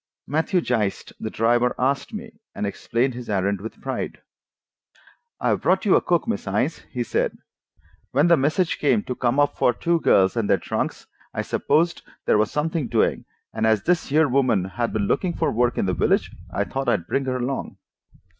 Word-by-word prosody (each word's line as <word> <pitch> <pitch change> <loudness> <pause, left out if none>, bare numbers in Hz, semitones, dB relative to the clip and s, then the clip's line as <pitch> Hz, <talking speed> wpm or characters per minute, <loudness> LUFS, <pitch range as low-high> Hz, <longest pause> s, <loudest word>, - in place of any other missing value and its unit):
Matthew 160 +5 +1
Geist, 110 -9 -1
the 110 - -4
driver, 120 +3 +2
asked 135 +2 0
for - - -9
me, 225 +1 -7 0.2
and - - -2
explained 120 +5 -1
his 120 -1 -8
errand 100 -1 0
with 110 - -8
pride. - - -4 1.2
"I've - - +1
brought 190 +2 +2
you 200 - +5
a - - +4
cook, 175 +3 +1
Miss 230 - -2
Innes," 125 +11 0
he 125 -2 -2
said. - - -1 0.7
"When 145 +6 +3
the 170 - +6
message 155 +5 +1
came 205 +8 +2
to 125 - -3
come 125 +2 0
up 145 - +2
for 125 - +4
two 170 +10 +1
girls 95 -9 +4
and 115 -3 -1
their - - +5
trunks, - - -3 0.3
I - - -1
supposed 170 +2 +1 0.2
there 105 - +3
was 110 - +2
something 155 -2 -1
doing, 115 -2 +1 0.3
and 110 - +1
as 110 -2 +2
this 175 +4 +1
here 155 +2 +3
woman 125 -8 +2
had 115 +5 -2
been 105 -2 0
looking 175 - 0
for - - 0
work 120 +1 +1
in - - +1
the 95 - 0
village, - - +1 0.2
I 100 +3 0
thought 135 +4 -2
I'd 95 -8 +1
bring 135 +9 -1
her 130 -1 -1
along." 125 +2 -3
125 Hz, 195 wpm, -23 LUFS, 110-155 Hz, 1.2 s, the